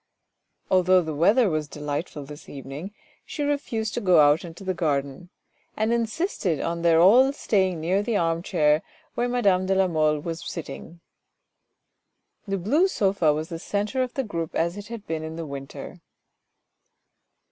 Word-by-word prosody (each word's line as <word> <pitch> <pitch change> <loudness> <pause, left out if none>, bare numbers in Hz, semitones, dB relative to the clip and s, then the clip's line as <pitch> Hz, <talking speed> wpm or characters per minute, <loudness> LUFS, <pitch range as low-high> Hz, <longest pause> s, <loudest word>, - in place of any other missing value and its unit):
Although 185 0 +4
the 160 -1 -4
weather 205 - +4
was 155 -4 -1
delightful 150 0 -5
this 150 +2 -11
evening, 140 +7 -7 0.3
she 295 - -5
refused 275 -7 -2
to - - -2
go 185 -4 +5
out 150 +1 +5
into 170 +2 -10
the 190 -1 -1
garden, 145 -1 -2 0.5
and 220 +2 +1
in 235 -1 +1
sisted 220 - -2
on 170 0 -2
their 165 -1 +4
all 240 +10 +6
staying 190 - 0
near 180 +5 +1
the 220 0 0
arm 165 -1 0
chair 155 -4 +2 0.3
where 245 +1 -1
madame 195 -7 +2
de 190 - +2
la 190 0 +3
Mole 155 -3 +1
was 165 +1 -5
sitting. 170 0 -8 1.5
The 195 0 -1
blue 280 - +2
sofa 195 - +2
was 155 +2 -3
the 165 - -5
centre 210 +8 -2
of 255 -1 -3
the 270 - 0
group 170 -8 -4
as 170 +2 0
it 205 0 -8
had 230 -3 -8
been 160 -1 -3
in 160 0 -6
the 165 0 -5
winter. 140 -2 -8
175 Hz, 170 wpm, -25 LUFS, 155-210 Hz, 1.5 s, all